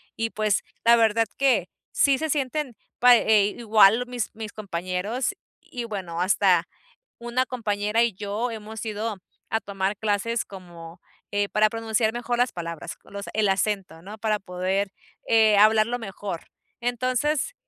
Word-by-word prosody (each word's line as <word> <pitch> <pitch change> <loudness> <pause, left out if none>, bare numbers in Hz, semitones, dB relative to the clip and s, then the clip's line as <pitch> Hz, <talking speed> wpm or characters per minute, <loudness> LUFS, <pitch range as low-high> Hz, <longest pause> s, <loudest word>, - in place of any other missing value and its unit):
Y 225 0 -1
pues 215 -3 0 0.2
la 235 +1 +8
verdad 225 0 +3
que 250 -10 +2 0.2
sí 275 -2 +3
se 315 - -2
sienten 275 -2 -1 0.2
pa 245 0 +8
eh, 215 -3 +4
igual 225 0 +5
mis 245 -2 -3
mis 220 -1 -6
compañeros 200 - -3 0.3
y 245 - -6
bueno, 185 -6 -5
hasta 185 -2 +3 0.5
una 240 +2 0
compañera 215 -3 -1
y 235 - +1
yo 205 +5 -3
hemos 220 -1 -7
ido 215 0 -3 0.3
a 225 - +2
tomar 195 0 -2
clases 220 +2 -1
como, 175 -3 -11 0.3
eh, 205 0 +1
para 215 0 +3
pronunciar 225 0 0
mejor 240 0 -2
las 245 0 +2
palabras, 170 -2 -6
los 200 0 -7
el 210 -2 +2
acento, 195 -4 -1
¿no? 205 +5 -9
Para 215 -1 0
poder, 190 +2 -2 0.4
eh, 220 -2 +5
hablarlo 215 +3 +4
mejor. 195 -5 -6 0.3
Entonces, 255 - 0
215 Hz, 145 wpm, -25 LUFS, 200-235 Hz, 0.5 s, la